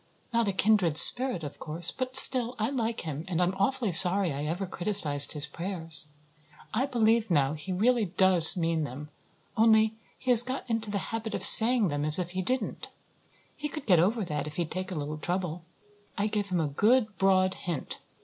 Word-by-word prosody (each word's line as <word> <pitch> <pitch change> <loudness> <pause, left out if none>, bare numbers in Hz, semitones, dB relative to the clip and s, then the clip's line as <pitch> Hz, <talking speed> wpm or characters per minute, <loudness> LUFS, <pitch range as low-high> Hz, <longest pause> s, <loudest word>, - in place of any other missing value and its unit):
Not 230 -2 -1
a - - -1
kindred 190 -5 0
spirit, 250 -7 +7
of 145 - -10
course; 160 +2 +4
but 255 0 -7
still 255 -2 +5
I 220 +4 -4
like 230 -4 -5
him 155 -1 -8
and 180 -3 -5
I'm 180 +1 -1
awfully 235 0 -2
sorry 180 0 +3
I 145 +2 -7
ever 175 +5 -5
criticized 175 -6 0
his 150 -1 -5
prayers. 165 -1 -4 0.7
I 255 +5 -2
believe 230 -3 -1
now 145 -4 -1
he 155 +5 -9
really 225 +4 -1
does 185 -2 +6
mean 165 -2 -3
them, 145 +2 -10 0.5
only 220 -1 +1 0.2
he 255 - -4
has 235 -2 +7
got 255 +2 -7
into 225 -2 -4
the 205 - -4 0.2
habit 225 -1 -6
of - - -5
saying 230 -3 +6
them 145 0 -5
as 155 +1 +5
if 180 -1 -5
he 185 +1 -5
didn't. 250 +3 -5 0.7
He 295 0 -7
could 305 -1 -9
get 180 -6 +2
over 205 +5 -2
that 150 -3 -6
if 150 - -10
he'd 170 -3 -6
take 185 +1 -6
a - - -7
little 150 0 -7
trouble. 180 0 -5 0.6
I 205 - -2
gave 210 -1 -4
him 180 -2 -3
a 160 - -2
good 215 - -1
broad 185 -1 0
hint. 170 -5 -8
190 Hz, 195 wpm, -25 LUFS, 165-225 Hz, 0.7 s, spirit